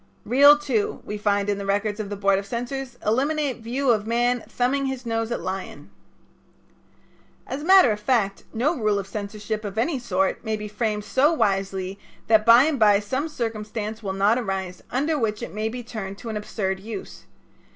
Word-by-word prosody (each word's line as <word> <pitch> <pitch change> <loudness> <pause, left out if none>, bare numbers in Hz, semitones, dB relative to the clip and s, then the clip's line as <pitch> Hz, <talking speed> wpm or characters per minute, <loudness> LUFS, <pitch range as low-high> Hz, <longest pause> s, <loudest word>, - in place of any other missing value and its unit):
"Reel 285 +4 +7
Two" 260 -8 -1
we 210 0 -5
find 205 -1 +1
in 205 -1 0
the 200 - -5
records 205 +1 0
of 210 -2 -4
the 205 - -4
Board 195 -1 +2
of 195 - -7
Censors 245 +3 -4
"eliminate 275 +4 0
view 245 +3 0
of 215 -2 0
man 240 +1 +1
thumbing 270 +3 0
his 265 -2 -4
nose 225 0 -2
at - - -2
lion." 190 0 -6 1.5
As 275 - -5
a - - -6
matter 375 - +7
of 210 - -2
fact, 210 -4 0
no 265 +9 0
rule 215 -6 +1
of 200 - -3
censorship 210 +1 -5
of 205 0 -6
any 265 +5 0
sort 190 -5 -1
may 220 -2 -1
be 210 0 -6
framed 210 0 -2
so 265 +8 +3
wisely 195 - -1 0.3
that 220 0 +3
by 235 +2 +9
and 300 -3 0
by 205 -2 +5
some 260 +9 -2
circumstance 220 -4 -4
will 200 -3 -3
not 205 +5 +3
arise 190 -5 -4
under 295 +4 0
which 215 -3 -1
it - - -6
may 215 +1 -2
be 245 +2 -6
turned 200 -4 -6
to 230 - -8
an 220 - -4
absurd 195 -2 -3
use. 220 +3 -8
220 Hz, 195 wpm, -24 LUFS, 205-250 Hz, 1.5 s, by